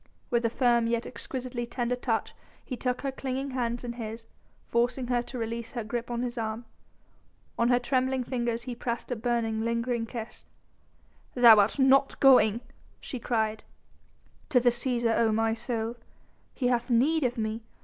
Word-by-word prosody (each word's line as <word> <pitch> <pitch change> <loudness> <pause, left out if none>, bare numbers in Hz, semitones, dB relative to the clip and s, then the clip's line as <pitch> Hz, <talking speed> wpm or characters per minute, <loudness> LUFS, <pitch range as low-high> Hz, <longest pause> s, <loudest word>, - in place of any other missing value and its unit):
With 240 -1 +2
a - - +3
firm 235 -1 +2
yet 235 0 0
exquisitely 250 -2 -5
tender 240 0 -1
touch 235 -3 -2 0.3
he 255 - -4
took 250 +1 -2
her 275 - -2
clinging 265 +1 -4
hands 240 -2 -2
in 240 -1 -4
his, 225 -1 -7 0.4
forcing 245 +2 0
her 245 -1 +2
to 250 - -8
release 230 0 -4
her 240 -3 -3
grip 235 +2 -4
on 240 0 -2
his 240 -1 -3
arm. 220 +1 -3 0.9
On 235 +1 +3
her 245 - +5
trembling 260 +1 0
fingers 240 -2 -2
then 250 +1 -6
he - - -5
pressed 235 +1 -4
a - - 0
burning, 225 -1 -1
lingering 235 0 -1
kiss. 225 -1 -7 0.9
"Thou 240 -3 +9
art 205 +6 +2
not 270 0 +4
going!" 245 -4 +6 0.4
she 255 - -6
cried. 220 -2 -1 0.9
"To 265 -5 +5
the 245 0 +4
Cæsar, 240 -1 0
O 225 -1 +3
my 225 +1 +1
soul! 230 0 -3 0.6
He 255 - -2
hath 240 0 0
need 280 +7 +3
of 245 -1 0
me! 220 0 -2
240 Hz, 170 wpm, -28 LUFS, 230-250 Hz, 0.9 s, Thou